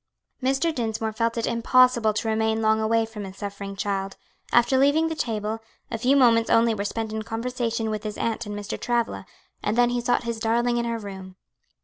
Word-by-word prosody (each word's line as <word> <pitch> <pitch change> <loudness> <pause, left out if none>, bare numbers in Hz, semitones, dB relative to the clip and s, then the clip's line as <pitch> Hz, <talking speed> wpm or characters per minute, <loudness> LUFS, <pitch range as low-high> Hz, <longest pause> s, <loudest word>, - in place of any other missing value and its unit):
Mr. 270 +6 +1
Dinsmore 220 -3 -2
felt 230 +1 -1
it 230 - 0
impossible 235 -1 +4
to 220 +1 -3
remain 220 0 +1
long 220 0 +2
away 225 +1 +2
from 220 -2 -8
his 190 0 -9
suffering 200 -1 -6
child; 195 -1 -3 0.3
after 240 +2 +4
leaving 295 +4 +3
the 320 - -3
table, 220 -4 -2 0.3
a 230 - -1
few 255 +4 +3
moments 230 -4 +4
only 230 0 +4
were 200 -2 -3
spent 220 +1 -3
in 220 - -2
conversation 230 0 -2
with 215 -1 -3
his 210 -1 -5
aunt 230 -1 -2
and 205 0 -5
Mr. 205 0 -5
Travilla, 240 -1 -1 0.3
and 210 +3 -1
then 245 0 +4
he 245 0 0
sought 245 +1 +1
his 235 -1 -3
darling 235 +2 +1
in 235 - 0
her 230 0 -1
room. 190 -3 -9
225 Hz, 205 wpm, -25 LUFS, 215-240 Hz, 0.3 s, impossible